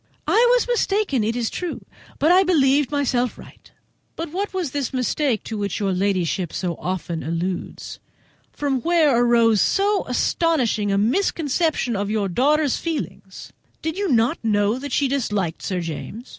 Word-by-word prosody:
I 480 Hz, +2 st, +4 dB
was -, -, -1 dB
mistaken, 405 Hz, -, +1 dB
it 225 Hz, +2 st, -1 dB
is 235 Hz, -2 st, -1 dB
true, 355 Hz, -2 st, -5 dB, 0.3 s
but 310 Hz, +4 st, +3 dB
I 370 Hz, +1 st, +6 dB
believed 290 Hz, -6 st, +3 dB
myself 260 Hz, -4 st, 0 dB
right." -, -, -15 dB, 0.4 s
"But 330 Hz, -1 st, -5 dB
what 395 Hz, +4 st, -3 dB
was 360 Hz, -7 st, -3 dB
this 280 Hz, -3 st, -2 dB
mistake 255 Hz, -2 st, 0 dB
to 220 Hz, -2 st, -5 dB
which 200 Hz, -1 st, -2 dB
your 195 Hz, -2 st, 0 dB
ladyship 185 Hz, -3 st, 0 dB
so 180 Hz, -2 st, -2 dB
often 175 Hz, -3 st, -3 dB
alludes? 175 Hz, +3 st, -4 dB, 0.5 s
from 275 Hz, -3 st, -1 dB
whence 325 Hz, -3 st, +3 dB
arose 235 Hz, -3 st, +4 dB
so 400 Hz, 0 st, +2 dB
astonishing 250 Hz, -, +1 dB
a 195 Hz, -, +2 dB
misconception 290 Hz, -, 0 dB
of 200 Hz, 0 st, -2 dB
your 210 Hz, -2 st, 0 dB
daughter's 285 Hz, -, +2 dB
feelings? 330 Hz, -3 st, -6 dB, 0.3 s
Did 320 Hz, 0 st, -2 dB
you 400 Hz, -1 st, -1 dB
not 230 Hz, -1 st, +2 dB
know 210 Hz, +1 st, +1 dB
that 285 Hz, 0 st, -6 dB
she 280 Hz, +2 st, +2 dB
disliked 210 Hz, -, -2 dB
Sir 185 Hz, -2 st, -2 dB
James?" 170 Hz, -, -7 dB
250 Hz, 155 wpm, -22 LUFS, 205-315 Hz, 0.5 s, I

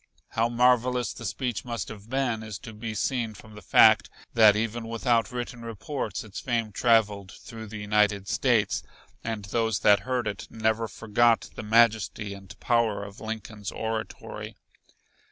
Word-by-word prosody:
How 115 Hz, +1 st, +1 dB
marvelous 125 Hz, -1 st, +2 dB
the -, -, -9 dB
speech 125 Hz, -5 st, -3 dB
must 120 Hz, -2 st, -4 dB
have 105 Hz, 0 st, -10 dB
been 130 Hz, -4 st, 0 dB
is 110 Hz, -3 st, -6 dB
to 110 Hz, -, -10 dB
be 110 Hz, +1 st, -5 dB
seen 115 Hz, -1 st, -1 dB
from 110 Hz, +2 st, -14 dB
the 105 Hz, -, -11 dB
fact -, -, +6 dB, 0.2 s
that 110 Hz, -3 st, +7 dB
even 115 Hz, +1 st, -2 dB
without 115 Hz, +1 st, +1 dB
written 125 Hz, -1 st, -5 dB
reports 115 Hz, -1 st, -4 dB
its 105 Hz, -3 st, -8 dB
fame 115 Hz, -4 st, -1 dB
traveled 105 Hz, -4 st, +2 dB
through 110 Hz, -2 st, -9 dB
the 105 Hz, +1 st, -7 dB
United 105 Hz, -1 st, +1 dB
States, 115 Hz, -5 st, +2 dB, 0.4 s
and 110 Hz, -3 st, -4 dB
those 110 Hz, -1 st, 0 dB
that 105 Hz, -1 st, +6 dB
heard 125 Hz, +3 st, -2 dB
it 100 Hz, -, -4 dB
never 110 Hz, 0 st, 0 dB
forgot 115 Hz, +2 st, +2 dB
the -, -, -6 dB
majesty 110 Hz, -2 st, +2 dB
and 95 Hz, 0 st, -12 dB
power 115 Hz, -4 st, +1 dB
of 100 Hz, 0 st, -10 dB
Lincoln's 110 Hz, -2 st, -6 dB
oratory. 110 Hz, -1 st, -5 dB
110 Hz, 155 wpm, -27 LUFS, 105-120 Hz, 0.4 s, that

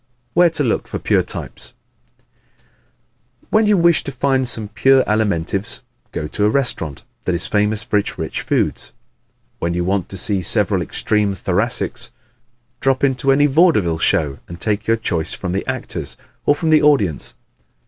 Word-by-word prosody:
Where 175 Hz, 0 st, +5 dB
to 165 Hz, -, -2 dB
Look -, -, -1 dB
for -, -, -4 dB
Pure -, -, +1 dB
Types -, -, -7 dB, 0.8 s
¶ -, -, -35 dB, 0.9 s
When 220 Hz, 0 st, +3 dB
you 210 Hz, -1 st, +4 dB
wish 170 Hz, -1 st, +4 dB
to 140 Hz, -, -3 dB
find 130 Hz, 0 st, 0 dB
some 110 Hz, -3 st, +1 dB
pure 130 Hz, +4 st, +3 dB
Alimentives, 100 Hz, -3 st, -1 dB, 0.3 s
go 75 Hz, -, -4 dB
to 105 Hz, +7 st, -3 dB
a -, -, +4 dB
restaurant 105 Hz, -, 0 dB, 0.2 s
that 90 Hz, -, 0 dB
is 85 Hz, -, 0 dB
famous 105 Hz, +1 st, 0 dB
for 105 Hz, -, +1 dB
its 100 Hz, -, -5 dB
rich -, -, -4 dB
foods. -, -, -2 dB, 0.7 s
When 85 Hz, 0 st, -2 dB
you 90 Hz, -, -1 dB
want 95 Hz, 0 st, -1 dB
to 95 Hz, -, -5 dB
see 100 Hz, +1 st, +3 dB
several -, -, +3 dB
extreme 105 Hz, -2 st, 0 dB
Thoracics, 100 Hz, +6 st, -2 dB, 0.7 s
drop 135 Hz, 0 st, 0 dB
into 135 Hz, 0 st, +2 dB
any 145 Hz, +2 st, +4 dB
vaudeville 135 Hz, -, +3 dB
show 75 Hz, -4 st, 0 dB
and 85 Hz, 0 st, -9 dB
take 105 Hz, +1 st, -2 dB
your 115 Hz, 0 st, +3 dB
choice 85 Hz, -7 st, -2 dB
from 90 Hz, -, -4 dB
the 95 Hz, +2 st, -2 dB
actors -, -, -5 dB, 0.3 s
or 145 Hz, -, +5 dB
from 160 Hz, +1 st, -1 dB
the 155 Hz, -1 st, +5 dB
audience. 135 Hz, -, +1 dB
105 Hz, 170 wpm, -19 LUFS, 90-135 Hz, 0.9 s, Where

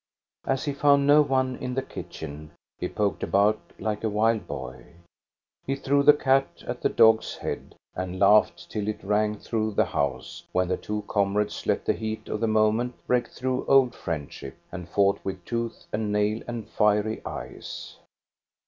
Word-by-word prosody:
As 135 Hz, +1 st, 0 dB
he 145 Hz, -, -1 dB
found 140 Hz, 0 st, +4 dB
no 145 Hz, +1 st, +7 dB
one 130 Hz, -2 st, +1 dB
in 125 Hz, 0 st, -4 dB
the 135 Hz, -, 0 dB
kitchen, 75 Hz, -, -8 dB, 0.3 s
he -, -, -2 dB
poked 105 Hz, -2 st, -1 dB
about 105 Hz, +2 st, +3 dB, 0.2 s
like 105 Hz, -1 st, -3 dB
a 110 Hz, -, +1 dB
wild 110 Hz, +1 st, +1 dB
boy. 65 Hz, +3 st, -8 dB, 0.7 s
He 135 Hz, -, 0 dB
threw 140 Hz, +1 st, +2 dB
the 140 Hz, -, +8 dB
cat 135 Hz, -1 st, +1 dB
at -, -, -5 dB
the -, -, +2 dB
dog's 110 Hz, 0 st, +4 dB
head, -, -, -5 dB, 0.2 s
and 90 Hz, 0 st, -4 dB
laughed 105 Hz, +2 st, +4 dB
till 105 Hz, -2 st, -3 dB
it 110 Hz, -, -3 dB
rang 105 Hz, +1 st, +1 dB
through 110 Hz, 0 st, -2 dB
the -, -, +4 dB
house 70 Hz, -4 st, -3 dB
when 90 Hz, 0 st, +1 dB
the -, -, +2 dB
two 105 Hz, 0 st, -4 dB
comrades 100 Hz, 0 st, 0 dB
let -, -, +1 dB
the -, -, +3 dB
heat 110 Hz, 0 st, -5 dB
of 105 Hz, -, -2 dB
the 115 Hz, -, +1 dB
moment 110 Hz, +3 st, +2 dB
break 125 Hz, -1 st, +1 dB
through 130 Hz, 0 st, -2 dB
old 135 Hz, -2 st, +5 dB
friendship, 80 Hz, -9 st, -6 dB
and 90 Hz, -2 st, -7 dB
fought 100 Hz, +2 st, +2 dB
with 95 Hz, -2 st, -5 dB
tooth 115 Hz, -1 st, -4 dB
and 105 Hz, -1 st, -1 dB
nail 105 Hz, +1 st, +1 dB
and 120 Hz, -3 st, -5 dB
fiery 105 Hz, +1 st, +1 dB
eyes. -, -, -7 dB
110 Hz, 175 wpm, -26 LUFS, 100-125 Hz, 0.7 s, the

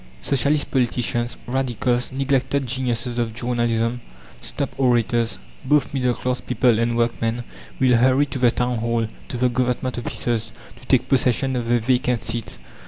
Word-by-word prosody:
Socialist 140 Hz, +2 st, +1 dB
politicians, 120 Hz, -2 st, 0 dB
radicals, 125 Hz, -1 st, -1 dB
neglected 135 Hz, 0 st, 0 dB
geniuses 120 Hz, -1 st, -2 dB
of 115 Hz, -2 st, -2 dB
journalism, 120 Hz, -1 st, 0 dB, 0.4 s
stump 140 Hz, -, -3 dB
orators 120 Hz, -3 st, +2 dB, 0.3 s
both 145 Hz, 0 st, +2 dB
middle 125 Hz, -3 st, +1 dB
class 125 Hz, 0 st, -2 dB
people 125 Hz, -3 st, +2 dB
and 115 Hz, 0 st, +1 dB
workmen 115 Hz, 0 st, 0 dB, 0.4 s
will 125 Hz, -2 st, +4 dB
hurry 130 Hz, +4 st, +4 dB
to 135 Hz, -2 st, -5 dB
the 125 Hz, -1 st, +5 dB
Town 125 Hz, 0 st, -1 dB
Hall, 115 Hz, 0 st, 0 dB, 0.2 s
to 125 Hz, -, -5 dB
the 125 Hz, +1 st, +3 dB
Government 125 Hz, 0 st, -1 dB
offices, 120 Hz, -1 st, -2 dB, 0.3 s
to -, -, -17 dB
take -, -, +3 dB
possession 130 Hz, 0 st, +2 dB
of 120 Hz, -2 st, -2 dB
the 120 Hz, 0 st, +3 dB
vacant 125 Hz, 0 st, +1 dB
seats. 115 Hz, 0 st, -3 dB
125 Hz, 150 wpm, -22 LUFS, 120-130 Hz, 0.4 s, the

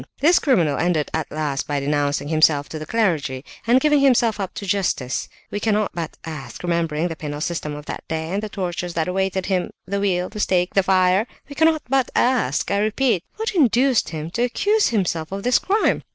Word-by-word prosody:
This 340 Hz, +4 st, +5 dB
criminal 175 Hz, -, +2 dB
ended 165 Hz, -3 st, 0 dB
at 160 Hz, -1 st, -2 dB
last 150 Hz, -3 st, -2 dB
by 145 Hz, -1 st, -1 dB
denouncing 145 Hz, 0 st, -1 dB
himself 155 Hz, -2 st, +3 dB
to 155 Hz, -, -6 dB
the 155 Hz, -, -7 dB
clergy, 155 Hz, -, 0 dB, 0.2 s
and 245 Hz, +2 st, +5 dB
giving 295 Hz, +1 st, +3 dB
himself 240 Hz, -5 st, +3 dB
up 195 Hz, -2 st, -4 dB
to 200 Hz, -, -5 dB
justice. 180 Hz, -10 st, -1 dB, 0.2 s
We 205 Hz, -, -2 dB
cannot 210 Hz, -1 st, +1 dB
but 165 Hz, -2 st, -5 dB
ask, 155 Hz, -1 st, -8 dB
remembering 170 Hz, -2 st, 0 dB
the 165 Hz, -, -5 dB
penal 145 Hz, -1 st, -5 dB
system 155 Hz, -2 st, -3 dB
of 150 Hz, 0 st, -9 dB
that -, -, -6 dB
day, 160 Hz, +1 st, -3 dB
and 200 Hz, +2 st, -1 dB
the 215 Hz, -, -5 dB
tortures 175 Hz, -3 st, -4 dB
that 160 Hz, 0 st, 0 dB
awaited 190 Hz, 0 st, -1 dB
him—the 190 Hz, +1 st, -2 dB
wheel, 180 Hz, -3 st, 0 dB
the 210 Hz, -, -8 dB
stake, 180 Hz, -3 st, +1 dB
the 195 Hz, -, +4 dB
fire!—we 190 Hz, +8 st, +1 dB
cannot 320 Hz, +1 st, +2 dB
but 265 Hz, -1 st, +1 dB
ask, 240 Hz, -, +1 dB
I 200 Hz, -, +2 dB
repeat, 215 Hz, -2 st, +1 dB
what 440 Hz, 0 st, -3 dB
induced 260 Hz, -, +3 dB
him 160 Hz, 0 st, -5 dB
to 235 Hz, -, -2 dB
accuse 410 Hz, -, +2 dB
himself 175 Hz, -7 st, -1 dB
of 195 Hz, +1 st, -4 dB
this 250 Hz, 0 st, +3 dB
crime? 415 Hz, +3 st, +1 dB
185 Hz, 195 wpm, -22 LUFS, 160-230 Hz, 0.2 s, This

